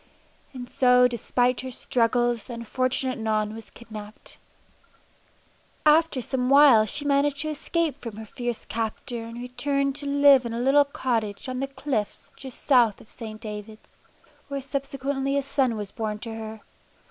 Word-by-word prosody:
And 250 Hz, -2 st, -8 dB
so 250 Hz, 0 st, +5 dB
despite 245 Hz, +1 st, 0 dB
her 260 Hz, -, -6 dB
struggles 240 Hz, -1 st, +1 dB
the 245 Hz, -, -8 dB
unfortunate 255 Hz, +2 st, -1 dB
Non 215 Hz, -1 st, 0 dB
was 225 Hz, 0 st, -10 dB
kidnapped. 215 Hz, -2 st, -10 dB, 1.5 s
After 305 Hz, -3 st, +4 dB
some 255 Hz, 0 st, -1 dB
while 275 Hz, -6 st, +7 dB
she 290 Hz, +6 st, -6 dB
managed 280 Hz, 0 st, +2 dB
to 310 Hz, -, -2 dB
escape 305 Hz, -1 st, -2 dB
from 230 Hz, -4 st, -7 dB
her 220 Hz, -, -7 dB
fierce 240 Hz, +1 st, -4 dB
captor 230 Hz, +1 st, -4 dB
and 230 Hz, +1 st, -8 dB
returned 275 Hz, +2 st, -1 dB
to 285 Hz, -1 st, -6 dB
live 280 Hz, -2 st, +6 dB
in 235 Hz, -1 st, -4 dB
a -, -, -2 dB
little 275 Hz, +3 st, +4 dB
cottage 230 Hz, -6 st, -2 dB
on 255 Hz, 0 st, -3 dB
the 270 Hz, -, -1 dB
cliffs 265 Hz, -5 st, -4 dB
just 265 Hz, -2 st, -11 dB
south 240 Hz, -7 st, +4 dB
of -, -, -15 dB
St. 215 Hz, -2 st, -8 dB
Davids, 215 Hz, -1 st, -9 dB, 0.5 s
where 280 Hz, -1 st, -4 dB
subsequently 275 Hz, 0 st, -2 dB
a 280 Hz, -, 0 dB
son 270 Hz, -3 st, +1 dB
was 205 Hz, -2 st, -5 dB
born 215 Hz, -1 st, -3 dB
to 225 Hz, +1 st, -7 dB
her. 220 Hz, -1 st, -7 dB
250 Hz, 160 wpm, -25 LUFS, 225-275 Hz, 1.5 s, while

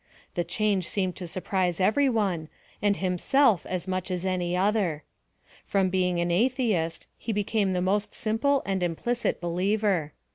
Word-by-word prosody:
The 175 Hz, -, 0 dB
change 200 Hz, -2 st, 0 dB
seemed 185 Hz, -3 st, -1 dB
to 180 Hz, -, -5 dB
surprise 180 Hz, 0 st, -1 dB
every 240 Hz, +9 st, +3 dB
one, 190 Hz, -9 st, 0 dB, 0.3 s
and 205 Hz, -1 st, +2 dB
himself 195 Hz, -, +2 dB
as 185 Hz, 0 st, -3 dB
much 185 Hz, 0 st, -2 dB
as 180 Hz, 0 st, -2 dB
any 180 Hz, -1 st, 0 dB
other. 190 Hz, -6 st, +1 dB, 0.6 s
From 190 Hz, -2 st, +1 dB
being 180 Hz, -2 st, +1 dB
an 175 Hz, 0 st, 0 dB
atlieist, 215 Hz, -5 st, +1 dB
he 230 Hz, -, -3 dB
became 205 Hz, -1 st, 0 dB
the 180 Hz, 0 st, 0 dB
most 200 Hz, +2 st, 0 dB
simple 260 Hz, +6 st, +1 dB
and 195 Hz, -1 st, -1 dB
implicit 205 Hz, +8 st, -1 dB
believer. 180 Hz, -1 st, 0 dB
190 Hz, 150 wpm, -27 LUFS, 180-210 Hz, 0.6 s, every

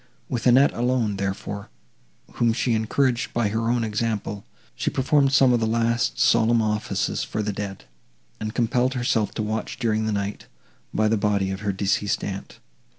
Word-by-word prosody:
With 120 Hz, 0 st, -1 dB
Annette 130 Hz, +3 st, +5 dB
alone, 120 Hz, -4 st, 0 dB
therefore, 100 Hz, +1 st, -4 dB, 0.7 s
whom 115 Hz, -1 st, +3 dB
she 120 Hz, 0 st, 0 dB
encouraged 120 Hz, +3 st, 0 dB
by 115 Hz, -3 st, +1 dB
her 115 Hz, +2 st, -1 dB
own 120 Hz, -1 st, +1 dB
example, 105 Hz, -2 st, -2 dB, 0.3 s
she -, -, -1 dB
performed 135 Hz, +1 st, +2 dB
some 135 Hz, -2 st, +5 dB
of 120 Hz, -, +3 dB
the 110 Hz, -, 0 dB
last 115 Hz, -, +1 dB
solemn 115 Hz, -, +4 dB
offices 105 Hz, -2 st, -1 dB
for 110 Hz, -, -3 dB
the 105 Hz, 0 st, -2 dB
dead, 100 Hz, -4 st, -6 dB, 0.5 s
and 110 Hz, +1 st, -4 dB
compelled 125 Hz, +2 st, +1 dB
herself 115 Hz, -4 st, +1 dB
to 110 Hz, -, -1 dB
watch 110 Hz, +1 st, -3 dB
during 110 Hz, -1 st, 0 dB
the -, -, 0 dB
night, 100 Hz, 0 st, -3 dB, 0.4 s
by 110 Hz, -, +1 dB
the 110 Hz, +1 st, +2 dB
body 100 Hz, -2 st, +1 dB
of 95 Hz, -, -4 dB
her 105 Hz, -1 st, -1 dB
deceased 100 Hz, +1 st, 0 dB
aunt. 95 Hz, -1 st, -6 dB
110 Hz, 170 wpm, -24 LUFS, 105-120 Hz, 0.7 s, Annette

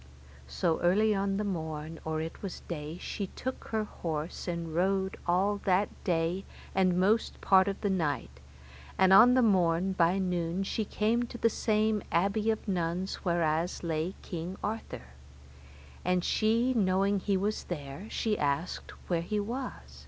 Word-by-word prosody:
So 65 Hz, -, 0 dB
early 210 Hz, +5 st, +3 dB
on 195 Hz, 0 st, 0 dB
the 210 Hz, -, -1 dB
morn, 160 Hz, -4 st, -4 dB
or 160 Hz, 0 st, -2 dB
it 160 Hz, +1 st, -6 dB
was 195 Hz, -3 st, -6 dB
day, 155 Hz, -1 st, -6 dB
she 200 Hz, +2 st, -4 dB
took 260 Hz, +7 st, -6 dB
her 220 Hz, -1 st, -1 dB
horse 165 Hz, -5 st, -5 dB
and 170 Hz, -2 st, -3 dB
rode 190 Hz, +2 st, +1 dB
all 195 Hz, +4 st, +2 dB
that 190 Hz, +2 st, +3 dB
day 175 Hz, +1 st, 0 dB, 0.3 s
and 185 Hz, -2 st, +3 dB
most 210 Hz, +4 st, +2 dB
part 190 Hz, 0 st, +5 dB
of 195 Hz, -, -2 dB
the 205 Hz, -, 0 dB
night, 145 Hz, -, -2 dB, 0.6 s
and 190 Hz, 0 st, +5 dB
on 245 Hz, +5 st, +8 dB
the 255 Hz, -, +5 dB
morn 185 Hz, -3 st, +3 dB
by 175 Hz, +1 st, +3 dB
noon 180 Hz, -1 st, -1 dB
she 215 Hz, +2 st, -2 dB
came 220 Hz, +4 st, +1 dB
to 240 Hz, -, -8 dB
the 230 Hz, -1 st, +2 dB
same 215 Hz, -1 st, +1 dB
abbey 200 Hz, +5 st, +1 dB
of 220 Hz, 0 st, -1 dB
nuns 180 Hz, 0 st, -1 dB
whereas 170 Hz, -1 st, 0 dB
lay 165 Hz, +2 st, -1 dB
King 175 Hz, +1 st, -5 dB
Arthur; 215 Hz, -, -4 dB, 1.0 s
and 180 Hz, 0 st, +1 dB
she 230 Hz, +6 st, +2 dB
knowing 195 Hz, -2 st, +2 dB
he 195 Hz, 0 st, +1 dB
was 205 Hz, +3 st, -1 dB
there, 150 Hz, +4 st, -6 dB
she 220 Hz, -2 st, -1 dB
asked 145 Hz, +4 st, -1 dB, 0.2 s
where 170 Hz, -2 st, +1 dB
he 210 Hz, +5 st, -2 dB
was. 245 Hz, +6 st, -3 dB
185 Hz, 160 wpm, -30 LUFS, 165-210 Hz, 1.0 s, on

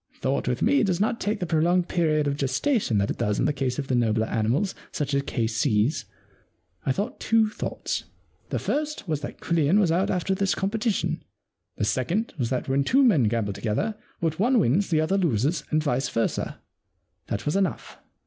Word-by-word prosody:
Thought 135 Hz, +1 st, -1 dB
with 125 Hz, -1 st, 0 dB
me 280 Hz, +6 st, +4 dB
does 185 Hz, -4 st, +1 dB
not 220 Hz, +3 st, +1 dB
take 210 Hz, +1 st, -1 dB
the 180 Hz, -, -1 dB
prolonged 170 Hz, +2 st, +2 dB
period 155 Hz, -4 st, +1 dB
of 140 Hz, -1 st, 0 dB
gestation 140 Hz, -, +1 dB
that 100 Hz, 0 st, +1 dB
it -, -, -6 dB
does 105 Hz, -3 st, 0 dB
in -, -, +1 dB
the 150 Hz, -, +2 dB
case 130 Hz, -3 st, -2 dB
of 145 Hz, -, -2 dB
the 130 Hz, -, -1 dB
nobler 110 Hz, -2 st, +2 dB
animals, 120 Hz, -, 0 dB, 0.2 s
such 145 Hz, -1 st, -2 dB
as 140 Hz, -, +2 dB
K.C.'s. 115 Hz, +2 st, +1 dB, 0.8 s
I -, -, +4 dB
thought 205 Hz, -, -3 dB
two 220 Hz, -1 st, +2 dB
thoughts. -, -, -4 dB, 0.4 s
The -, -, -1 dB
first 300 Hz, -6 st, -2 dB
was 155 Hz, -3 st, -1 dB
that 145 Hz, -, -7 dB
Quillian 165 Hz, +2 st, +2 dB
was 185 Hz, -6 st, +3 dB
out 180 Hz, +3 st, +1 dB
after 185 Hz, +1 st, 0 dB
this 195 Hz, 0 st, +1 dB
competition. 210 Hz, +2 st, -1 dB, 0.6 s
The -, -, 0 dB
second 165 Hz, -, -1 dB
was 120 Hz, -3 st, 0 dB
that 130 Hz, -1 st, -2 dB
when 135 Hz, +1 st, +2 dB
two 270 Hz, -, +4 dB
men 175 Hz, -, +4 dB
gamble 105 Hz, -2 st, 0 dB
together 115 Hz, -, -1 dB, 0.3 s
what 160 Hz, -1 st, -1 dB
one 245 Hz, +5 st, +3 dB
wins 190 Hz, -, +2 dB
the 160 Hz, -3 st, +2 dB
other 190 Hz, +5 st, +1 dB
loses 150 Hz, -, +1 dB
and 155 Hz, 0 st, +1 dB
vice 130 Hz, -3 st, 0 dB
versa. 115 Hz, -, -1 dB, 0.7 s
That 105 Hz, +2 st, -3 dB
was 150 Hz, -, 0 dB
enough. 195 Hz, -3 st, -1 dB
155 Hz, 195 wpm, -25 LUFS, 125-195 Hz, 0.8 s, me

